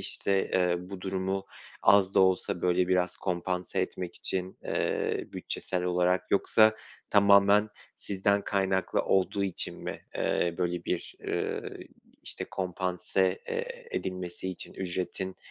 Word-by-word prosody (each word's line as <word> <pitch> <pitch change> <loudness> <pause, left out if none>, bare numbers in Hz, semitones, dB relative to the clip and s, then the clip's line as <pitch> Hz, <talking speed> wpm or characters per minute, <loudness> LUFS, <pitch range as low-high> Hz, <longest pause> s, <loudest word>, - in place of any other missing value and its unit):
İşte, 100 -1 0
eee, 90 -1 +3
bu 90 +1 -8
durumu 95 +1 -2 0.4
az 100 -1 +5
da - - +6
olsa, 95 0 +2
böyle, 90 0 +2
biraz 90 -1 +2
kompanse 90 0 -2
etmek 90 -1 -4
için, 95 0 -3
eee, - - -1
bütçesel 90 -1 -3
olarak, 90 0 +1
yoksa 110 +2 +5 0.3
tamamen 100 +1 +6 0.3
sizden 100 +1 +1
kaynaklı 95 -2 +1
olduğu 95 +1 +1
için 95 -3 -2
mi, - - -4 0.2
eee, 85 -1 +1
böyle 90 -1 -1
bir, 90 - -3
ııı, - - -3 0.4
işte, - - -4
kompanse, 95 +1 -1
eee, 485 0 -4
edilmesi 90 0 -4
için 90 - -8
ücretin 95 +1 -3
95 Hz, 125 wpm, -29 LUFS, 90-100 Hz, 0.4 s, da